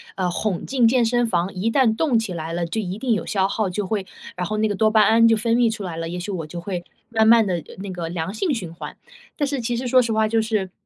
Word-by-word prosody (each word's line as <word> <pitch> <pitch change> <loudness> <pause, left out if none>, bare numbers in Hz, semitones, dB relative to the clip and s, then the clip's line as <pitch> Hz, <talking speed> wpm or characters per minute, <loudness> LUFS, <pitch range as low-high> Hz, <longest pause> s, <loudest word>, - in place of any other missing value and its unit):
呃， 185 -2 0
哄 190 -2 -2
进 250 -4 +3
健 240 -1 +3
身 240 0 +1
房， 180 -2 -1
一 195 +5 -1
旦 230 -3 +3
动 265 -4 +2
起 220 -5 -2
来 165 0 -5
了， 170 0 -1
就 220 +6 -2
一 190 +1 -4
定 245 -1 0
有 - - -1
消 195 -2 +1
耗， 205 -1 -1
就 200 +2 -3
会 200 -1 -2 0.3
然 180 -1 -3
后 215 0 -2
那 215 0 +2
个 205 - -1
多 215 +2 +3
巴 215 0 +4
胺 230 +2 +5
就 225 -1 +4
分 230 +1 +1
泌 235 -2 +3
出 210 -2 -6
来 175 -3 -5
了， 165 0 -4
也 180 +1 -4
许 200 +3 -5
我 165 -5 -4
就 170 +2 -7
会 175 -1 -4 0.3
慢 220 -1 +2
慢 230 -1 +6
地 175 -5 -2 0.2
那 195 - -5
个 170 -2 -5
良 170 +2 -4
性 300 - -1
循 185 -10 -4
环。” - - -9 0.4
但 290 - +1
是 275 -3 -2
其 240 +1 -2
实 250 +1 -3
说 255 +1 +5
实 230 -2 -1
话 220 0 +2
就 225 0 +1
是 215 -4 -2
215 Hz, 310 characters per minute, -22 LUFS, 180-230 Hz, 0.4 s, 慢